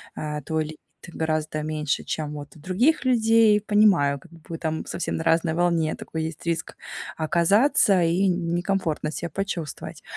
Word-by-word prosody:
э, 150 -1 -4
твой 160 -1 -1
ли 155 0 -9 0.3
ты 175 - -10
гораздо 155 -1 -2
меньше, 155 -2 -2
чем 150 -1 -4
вот 145 +2 -9
у - - -15
других 230 - +1
людей. 225 -3 +4
Понимаю, 200 -10 +3
как - - -19
бы 165 - -15
вы 165 - -5
там 160 -1 -3
совсем - - -3
на 160 - -3
разной 165 0 +2
волне. 170 -2 +1
Такой 160 -1 -5
есть 160 +1 -7
риск 170 -1 -2 0.4
оказаться 185 - +3
и 175 +4 +2
некомфортно 175 -2 -1
ся 170 - -4
почувствовать. 185 -6 -5
165 Hz, 165 wpm, -24 LUFS, 155-195 Hz, 0.4 s, людей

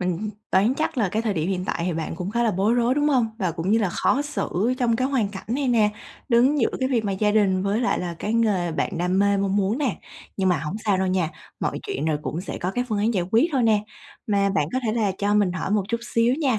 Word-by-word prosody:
Mình 180 +4 -2 0.2
đoán 210 +7 +3
chắc 310 -4 -2
là 210 - +2
cái 215 +5 -1
thời 215 -4 -1
điểm 160 +2 -1
hiện 185 -1 -2
tại 170 - -2
thì 180 - 0
bạn 160 0 -3
cũng 180 +3 -4
khá 235 +1 0
là 230 - +3
bối 205 +5 +1
rối, 245 +1 +2
đúng 295 +1 +2
hông? 255 -6 +3
Và 185 -4 0
cũng 170 +4 -2
như 225 - +4
là 205 -4 +1
khó 270 +10 +1
xử 255 -5 -1
trong 235 -2 +2
cái 255 +2 0
hoàn 250 -8 +1
cảnh 195 -1 -9
này 265 +2 0
nè, 220 -3 +3 0.4
đứng 255 +4 +4
giữa - - +3
cái 260 - +1
việc 235 -5 0
mà 200 - -1
gia 210 +2 +1
đình 195 -3 +2
với 200 +4 0
lại 245 - +1
là 175 -1 -4
cái 215 +2 -2
nghề 200 -7 +1
bạn 170 +2 -2
đam 180 +2 +1
mê, 200 0 +3
mong 195 0 0
muốn 205 +6 +1
nè. 275 -4 0 0.4
Nhưng 190 -1 +1
mà 180 - +2
hổng 150 +7 -4
sao 200 -3 +2
đâu 190 - +1
nha, 185 -3 0 0.3
mọi - - -1
chuyện 400 - -3
rồi 155 -2 0
cũng 165 +3 -3
sẽ 190 - -6
có 180 - -2
cái 245 +4 -1
phương 210 -2 -1
án 225 +3 +1
giải 180 -3 +1
quyết 240 +10 +4
thôi 260 -3 +2
nè. 215 -2 +3 0.4
Mà 200 -2 +2
bạn 155 -6 0
có 255 - +1
thể 215 - +1
là 215 -4 +1
cho 205 +1 +1
mình 200 -4 +3
hỏi 185 +2 -3
một 210 -1 +2
chút 235 0 -1
xíu 230 +2 +3
nha. 270 -7 +1
210 Hz, 285 wpm, -24 LUFS, 185-235 Hz, 0.4 s, như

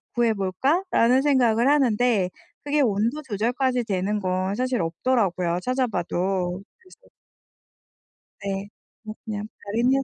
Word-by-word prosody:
구해 235 -2 +3
볼까?'라는 260 - +2
생각을 245 -4 +3
하는데 245 -8 +2 0.3
그게 290 0 +1
온도 230 +5 +1
조절까지 245 +3 0
되는 200 +1 -1
건 185 0 -1
사실 255 -1 -1
없더라고요, 175 -1 0
찾아 255 0 0
봐도. 180 -1 -2 0.2
그래서 375 +6 -21 1.3
네. 195 0 -3 0.4
뭐 215 0 -7
그냥 210 -1 -4 0.2
바람이었어요. 240 +6 +1
225 Hz, 280 characters per minute, -24 LUFS, 195-255 Hz, 1.3 s, 구해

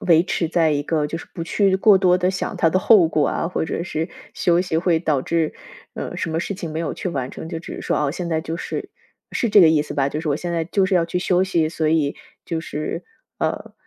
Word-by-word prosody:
维 165 -2 +5
持 170 -3 -1
在 165 -2 +2
一 145 - 0
个， 150 0 0
就 165 - -4
是 - - -9
不 165 - -5
去 195 +2 +2
过 195 +1 +6
多 180 -1 +4
地 180 0 +1
想 185 - -3
它 165 - +3
的 185 - +2
后 195 -3 +6
果 155 -2 +1
啊， - - -1
或 175 - -2
者 170 - -3
是 160 -2 -3 0.3
休 175 0 +2
息 180 -3 -1
会 165 -1 +2
导 150 -5 0
致， 165 -2 0 0.4
呃， - - -5
什 - - -2
么 160 +1 -1
事 200 - -3
情 170 -5 -6
没 160 - -2
有 165 - -2
去 - - -4
完 135 -6 -3
成， 160 - -8
就 165 - -4
只 - - -8
是 - - -7
说， - - 0
啊， 145 -2 +1
现 175 +2 -4
在 160 -1 0
就 160 +1 -4
是 - - -5 0.4
是 235 - 0
这 205 -1 +7
个 165 - +8
意 160 -1 +4
思 150 - -7
吧？ 135 -1 +1
就 150 +2 -3
是 160 - -4
我 145 - +2
现 175 +1 -4
在 165 -1 0
就 190 +3 +1
是 190 - 0
要 170 - +3
去 170 +2 -2
休 180 0 +2
息， 170 -4 +1
所 160 -1 -1
以 155 -3 +1 0.3
就 165 -2 -3
是， 155 +2 -4 0.3
呃， - - -2
165 Hz, 290 characters per minute, -22 LUFS, 160-180 Hz, 0.4 s, 个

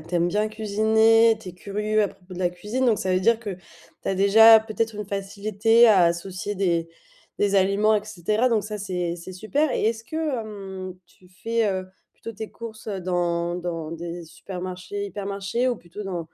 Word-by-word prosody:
tu 165 +3 -8
aimes 175 0 +2
bien 210 +4 +1
cuisiner, 220 +1 +3
tu 195 - -9
es - - -7
curieux 210 +3 -1
à - - -1
propos 185 0 -14
de - - -8
la 180 -1 +2
cuisine, 210 +9 -2
donc 225 -4 +3
ça 185 - 0
veut 185 - +3
dire 230 +3 +3
que, 205 -4 -5 0.5
tu - - -4
as 195 - +1
déjà, 220 +3 +8
peut-être 220 0 -3
une 210 -1 -5
facilité, 205 +3 +2
à 195 -5 +6
associer 185 +4 -2
des 170 -4 0 0.5
des 200 -1 +2
aliments, 200 +3 +3
et 205 - -3
cetera. 215 +4 0
Donc 225 -3 +1
ça, 210 0 -5
c'est 180 -3 -3
c'est 175 +2 -9
super. 255 +10 0
Et - - 0
est-ce 225 0 -1
que, 270 - -11
hem, 205 - -4
tu 180 +1 -23
fais, 225 +4 -1
heu, 185 -1 -4 0.2
plutôt 230 - -9
tes 220 0 -7
courses 230 -1 -10
dans 175 -3 -1
dans 165 -3 -4
des 170 +1 -6
supermarchés, 185 +3 -6
hypermarchés, 200 +5 -2
ou 245 - 0
plutôt 175 +2 -10
dans, 185 -3 -3
200 Hz, 195 wpm, -24 LUFS, 180-220 Hz, 0.5 s, déjà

